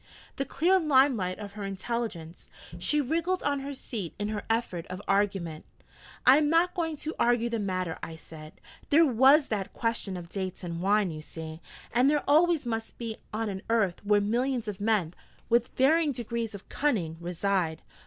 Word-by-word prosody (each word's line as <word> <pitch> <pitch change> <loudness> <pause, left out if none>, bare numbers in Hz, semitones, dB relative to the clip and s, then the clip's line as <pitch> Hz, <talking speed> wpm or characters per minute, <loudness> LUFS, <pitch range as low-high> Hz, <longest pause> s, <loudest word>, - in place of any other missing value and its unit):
The 275 - -1
clear 370 +6 +3
limelight 260 - +3
of 205 -2 -8
her 210 -1 -6
intelligence! 195 -4 -5 0.3
She 295 +11 +1
wriggled 330 +6 0
on 285 -1 +1
her 280 +1 -5
seat 210 -9 -6
in 205 0 -2
her 210 -1 -2
effort 225 -7 -1
of 185 0 -6
argument. 195 -6 0 0.6
'I 260 +2 +8
am 300 -1 +2
not 335 +3 +3
going 325 -3 -2
to 310 +3 -4
argue 235 0 +2
the 230 - -1
matter,' 185 -4 -2
I 165 - -6
said. 155 -1 -12 0.4
'There 325 +3 +6
was 270 +3 +5
that 200 -3 -3
question 230 -5 -2
of 175 -1 -8
dates 185 0 -5
and 170 -1 -4
wine, 200 -1 +2
you 155 -1 -7
see. 160 +1 -8 0.3
And 250 +4 +4
there 295 0 +2
always 320 +1 +4
must 225 -1 -4
be 230 -2 -5
on 225 +1 -2
an 190 -2 -4
earth 210 -6 +1
where 205 0 +4
millions 240 +3 0
of 205 -1 -5
men, 205 -6 +1 0.4
with 235 +1 +3
varying 300 +3 +4
degrees 235 -2 -3
of 195 - -11
cunning, 195 - -1
reside.' 175 -2 -1
220 Hz, 180 wpm, -28 LUFS, 185-270 Hz, 0.6 s, I